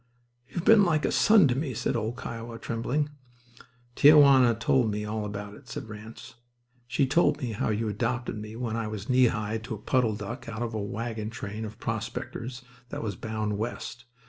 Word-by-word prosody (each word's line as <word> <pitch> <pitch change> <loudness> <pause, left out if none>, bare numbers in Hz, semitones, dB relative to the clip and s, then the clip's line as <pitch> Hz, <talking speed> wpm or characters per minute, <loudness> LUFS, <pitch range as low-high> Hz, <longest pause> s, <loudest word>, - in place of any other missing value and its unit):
"You've 175 +6 -5
been 225 -2 +7
like 160 -5 +2
a - - +1
son 210 -7 +6
to 125 - +2
me," 135 -3 -2
said - - -1
old 110 +3 -2
"Kiowa," 115 -1 -6
trembling. 125 +7 -1 0.8
"Tia 150 +5 +7
Juana 130 -5 +7
told 115 +1 +2
me 105 0 -2
all 105 0 -3
about 105 0 -6
it," 125 +2 -15
said 115 - -6
Ranse. 110 +2 -10 0.5
"She 135 +3 +2
told 145 +6 +3
me 130 -6 -3
how 110 - -1
you 110 +1 0
adopted 120 +4 -2
me 110 +1 -7
when 115 -2 -3
I 115 -1 -2
was 105 +1 -6
knee 130 -1 +5
high 110 0 -2
to 115 +1 -6
a - - -8
puddle 115 +1 +1
duck 105 +2 -6
out 115 +1 -4
of 115 -1 -4
a 110 - -2
wagon 110 +1 -4
train 110 -1 -5
of 105 0 -8
prospectors 120 +2 -5 0.3
that - - -5
was 105 -4 -3
bound 110 -1 -3
West. 120 +2 -5
115 Hz, 195 wpm, -28 LUFS, 105-125 Hz, 0.8 s, been